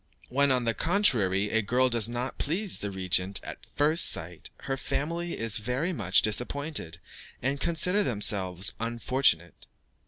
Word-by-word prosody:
When, 140 Hz, +2 st, +2 dB
on 130 Hz, -2 st, +2 dB
the 115 Hz, -, +1 dB
contrary, 105 Hz, -, +2 dB
a 110 Hz, -, +2 dB
girl 125 Hz, +5 st, +1 dB
does 115 Hz, -3 st, +2 dB
not 120 Hz, +2 st, -5 dB
please 185 Hz, +6 st, -1 dB
the 105 Hz, -, -4 dB
regent 95 Hz, 0 st, 0 dB
at -, -, -10 dB
first 155 Hz, +3 st, +4 dB
sight, 85 Hz, 0 st, -1 dB
her 135 Hz, -, -3 dB
family 170 Hz, +6 st, -3 dB
are 115 Hz, -, -2 dB
very 125 Hz, -, -1 dB
much 95 Hz, -, +1 dB
disappointed, 125 Hz, -, -2 dB, 0.4 s
and 135 Hz, +3 st, -2 dB
consider 180 Hz, +4 st, +1 dB
themselves 100 Hz, -, +1 dB
unfortunate. 115 Hz, -, 0 dB
120 Hz, 145 wpm, -27 LUFS, 100-145 Hz, 0.4 s, first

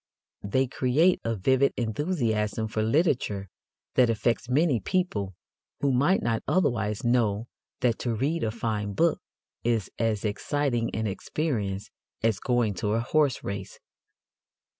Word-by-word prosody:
They 130 Hz, +7 st, +1 dB
create 135 Hz, +8 st, +2 dB
a 115 Hz, 0 st, -1 dB
vivid 130 Hz, +7 st, +3 dB
enthusiasm 110 Hz, -, 0 dB
for 110 Hz, -, -1 dB
literature 110 Hz, -, +1 dB, 0.4 s
that 125 Hz, -2 st, +4 dB
affects 115 Hz, +2 st, 0 dB
many 140 Hz, -1 st, +3 dB
people 105 Hz, -, -1 dB, 0.4 s
who 140 Hz, -, +2 dB
might 145 Hz, +9 st, +3 dB
not 115 Hz, -1 st, 0 dB
otherwise 110 Hz, -, +1 dB
know 115 Hz, -3 st, +2 dB, 0.4 s
that 120 Hz, -2 st, +2 dB
to 120 Hz, -2 st, -1 dB
read 145 Hz, +9 st, 0 dB
a 110 Hz, -, +1 dB
fine 110 Hz, -2 st, -2 dB
book 165 Hz, +9 st, +2 dB, 0.4 s
is 115 Hz, -5 st, 0 dB
as 110 Hz, -2 st, 0 dB
exciting 120 Hz, +2 st, 0 dB
an 110 Hz, -, -1 dB
experience 105 Hz, -2 st, -2 dB, 0.3 s
as 110 Hz, -3 st, +2 dB
going 120 Hz, -4 st, +1 dB
to 105 Hz, 0 st, +1 dB
a 115 Hz, -, +2 dB
horse 140 Hz, +2 st, +1 dB
race. 100 Hz, -1 st, -5 dB
115 Hz, 135 wpm, -27 LUFS, 105-135 Hz, 0.4 s, that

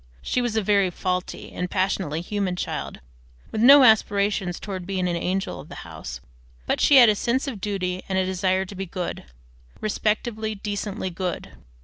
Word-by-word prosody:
She 250 Hz, -, 0 dB
was 240 Hz, -3 st, -2 dB
a 220 Hz, -, +1 dB
very 200 Hz, -1 st, +3 dB
faulty 180 Hz, +1 st, -3 dB
and 180 Hz, 0 st, -4 dB
passionately 185 Hz, -5 st, -1 dB
human 195 Hz, 0 st, -2 dB
child, -, -, -4 dB, 0.5 s
with 220 Hz, -, -2 dB
no 275 Hz, +3 st, +9 dB
aspirations 200 Hz, -5 st, +3 dB
towards 190 Hz, -3 st, -6 dB
being 185 Hz, -2 st, -1 dB
an 175 Hz, -, -1 dB
angel 185 Hz, +3 st, -2 dB
of -, -, -11 dB
the -, -, -9 dB
house, -, -, -8 dB, 0.4 s
but -, -, 0 dB
she 290 Hz, -, +6 dB
had 250 Hz, -3 st, +9 dB
a 215 Hz, -, +5 dB
sense 240 Hz, +6 st, -1 dB
of 225 Hz, -8 st, -5 dB
duty 185 Hz, -3 st, -2 dB
and 190 Hz, -, 0 dB
a 190 Hz, -, +2 dB
desire 185 Hz, 0 st, 0 dB
to 190 Hz, -, -10 dB
be 195 Hz, 0 st, -5 dB
good, 180 Hz, 0 st, -5 dB, 0.5 s
respectably, 215 Hz, +1 st, -1 dB
decently 205 Hz, -1 st, -4 dB
good. 180 Hz, +1 st, -4 dB
195 Hz, 175 wpm, -24 LUFS, 185-215 Hz, 0.5 s, no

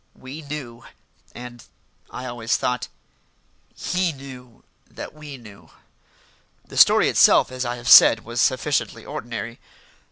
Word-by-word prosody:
We 135 Hz, +5 st, -10 dB
knew; 135 Hz, -5 st, -8 dB, 0.5 s
and, 120 Hz, -1 st, -10 dB, 0.5 s
I 125 Hz, -, -8 dB
always 120 Hz, -2 st, -2 dB
thought, 125 Hz, 0 st, -2 dB, 0.9 s
he 180 Hz, -1 st, -1 dB
knew 130 Hz, -4 st, -13 dB, 0.3 s
that -, -, -9 dB
we 150 Hz, -2 st, -10 dB
knew. 105 Hz, -5 st, -16 dB, 1.0 s
The -, -, -13 dB
story -, -, +6 dB
itself, -, -, +4 dB
as 130 Hz, 0 st, -4 dB
I 120 Hz, 0 st, -3 dB
have 120 Hz, 0 st, -10 dB
said, 115 Hz, -2 st, +7 dB
was 120 Hz, +1 st, -2 dB
sufficiently 135 Hz, +1 st, -1 dB
ordinary. 115 Hz, 0 st, -7 dB
125 Hz, 125 wpm, -22 LUFS, 120-140 Hz, 1.0 s, said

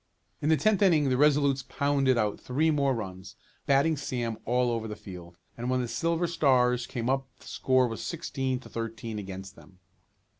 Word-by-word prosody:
In 150 Hz, -, 0 dB
the 160 Hz, -, +5 dB
tenth 215 Hz, +1 st, +2 dB
inning 160 Hz, -8 st, +4 dB
the 130 Hz, -, +2 dB
Resolutes 140 Hz, -1 st, +3 dB
pounded 135 Hz, 0 st, +1 dB
out 105 Hz, -2 st, 0 dB
three 155 Hz, +6 st, +1 dB
more 140 Hz, -3 st, +1 dB
runs, 95 Hz, -2 st, -7 dB, 0.3 s
batting 140 Hz, +3 st, +3 dB
Sam 120 Hz, -5 st, -3 dB
all 125 Hz, +1 st, +2 dB
over 115 Hz, -1 st, -2 dB
the 105 Hz, -, -5 dB
field, 90 Hz, -3 st, -11 dB, 0.2 s
and 120 Hz, +1 st, -4 dB
when 130 Hz, 0 st, +1 dB
the 125 Hz, -, -1 dB
Silver 165 Hz, +6 st, 0 dB
Stars 125 Hz, -7 st, +2 dB
came 120 Hz, -1 st, -4 dB
up 135 Hz, +1 st, 0 dB
the -, -, -18 dB
score 130 Hz, -1 st, +2 dB
was 115 Hz, -1 st, -5 dB
sixteen 135 Hz, -6 st, -2 dB
to -, -, -13 dB
thirteen 115 Hz, -1 st, -5 dB
against 95 Hz, -1 st, -8 dB
them. 85 Hz, +3 st, -18 dB
125 Hz, 185 wpm, -28 LUFS, 115-140 Hz, 0.3 s, the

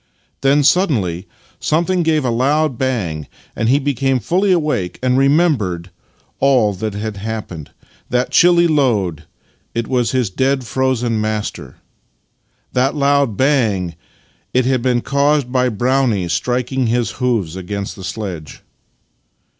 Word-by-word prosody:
Then 140 Hz, +2 st, +3 dB
suddenly 105 Hz, -, +1 dB, 0.3 s
something 175 Hz, +4 st, +1 dB
gave 155 Hz, -4 st, +1 dB
aloud 135 Hz, +4 st, +1 dB
bang, 105 Hz, -, -2 dB, 0.3 s
and 110 Hz, -, 0 dB
he 135 Hz, -, +5 dB
became 135 Hz, -2 st, 0 dB
fuJly 185 Hz, -, +1 dB
awake 150 Hz, -, 0 dB
and 125 Hz, 0 st, +2 dB
remembered 135 Hz, -, +1 dB, 0.5 s
all 125 Hz, -7 st, +3 dB
that 100 Hz, +2 st, -4 dB
had 105 Hz, 0 st, -4 dB
happened. 100 Hz, -7 st, -6 dB, 0.4 s
That 125 Hz, +1 st, 0 dB
chilly 175 Hz, 0 st, +5 dB
load 115 Hz, -, +1 dB, 0.3 s
— -, -, -42 dB
it 115 Hz, -1 st, -1 dB
was 125 Hz, -3 st, +1 dB
his 125 Hz, -6 st, 0 dB
dead 130 Hz, +5 st, 0 dB
frozen 120 Hz, -3 st, 0 dB
master. 110 Hz, -1 st, -4 dB, 1.0 s
That 130 Hz, +3 st, +1 dB
loud 140 Hz, -6 st, +2 dB
bang 110 Hz, -, +1 dB, 0.3 s
— -, -, -39 dB
it 130 Hz, -1 st, +3 dB
had 130 Hz, -1 st, +1 dB
been 125 Hz, -1 st, +1 dB
caused 140 Hz, -1 st, +1 dB
by 125 Hz, -1 st, +2 dB
Brownie 120 Hz, -4 st, 0 dB
striking 125 Hz, -, -1 dB
his 120 Hz, +1 st, 0 dB
hoofs 110 Hz, -10 st, 0 dB
against 100 Hz, +2 st, -5 dB
the 95 Hz, -, -10 dB
sledge. 95 Hz, -, -6 dB
125 Hz, 130 wpm, -18 LUFS, 105-140 Hz, 1.0 s, he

